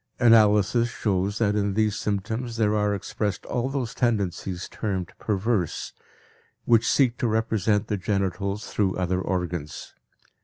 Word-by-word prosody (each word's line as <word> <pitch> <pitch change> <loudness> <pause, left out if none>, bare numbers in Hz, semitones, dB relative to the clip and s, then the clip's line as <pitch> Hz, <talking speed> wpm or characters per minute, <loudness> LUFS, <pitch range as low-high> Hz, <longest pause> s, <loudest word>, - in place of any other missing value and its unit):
Analysis 115 0 +5
shows 100 -3 -1
that 105 -2 +1
in 100 -1 0
these 110 -1 +2
symptoms 110 +4 -3
there 105 -2 +2
are 105 -1 +1
expressed 105 +1 -3
all 125 +2 -1
those 135 -4 -3
tendencies 95 -6 -1
termed 95 -5 -4
perverse, 105 -3 -1 0.7
which 115 -1 +4
seek 125 -4 +2
to 120 - +1
represent 110 -2 +1
the 105 -1 -2
genitals 100 +1 -2
through 95 -3 +1
other 90 0 -1
organs. 90 -5 -4
105 Hz, 130 wpm, -25 LUFS, 95-115 Hz, 0.7 s, Analysis